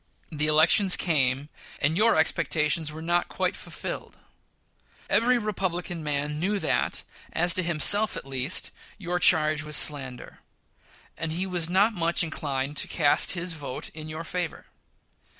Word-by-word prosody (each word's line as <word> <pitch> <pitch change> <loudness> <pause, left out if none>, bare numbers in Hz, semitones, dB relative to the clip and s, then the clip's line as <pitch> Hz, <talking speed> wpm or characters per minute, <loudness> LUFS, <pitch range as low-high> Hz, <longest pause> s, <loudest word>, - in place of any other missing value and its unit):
The 150 -1 -1
elections 160 +5 +5
came, 140 -4 0 0.3
and 150 +3 0
your 220 +5 +3
expectations 160 0 +1
were 160 +1 -9
not 175 +1 0
quite - - -2
fulfilled. - - -7 0.9
Every 240 +4 +3
Republican 185 -6 -3
man 150 0 -2
knew 200 +5 0
that, - - -1 0.3
as 175 +1 +3
to 185 - +1
himself 175 +6 +4
at - - -8
least, 135 +4 -2 0.3
your 180 -2 -3
charge 155 -3 +4
was 150 -1 -4
a - - +6
slander, 135 -4 -3 0.8
and 160 -1 -3
he 180 +3 -2
was 175 -3 -2
not 200 +5 +3
much 170 -3 +1
inclined 140 -4 -3
by - - -11
it 145 - -12
to - - 0
cast 145 -4 +3
his 175 -1 -2
vote 140 -5 -7
in 155 0 -9
your 155 +1 -6
favor. 175 -1 -5
160 Hz, 155 wpm, -26 LUFS, 150-180 Hz, 0.9 s, a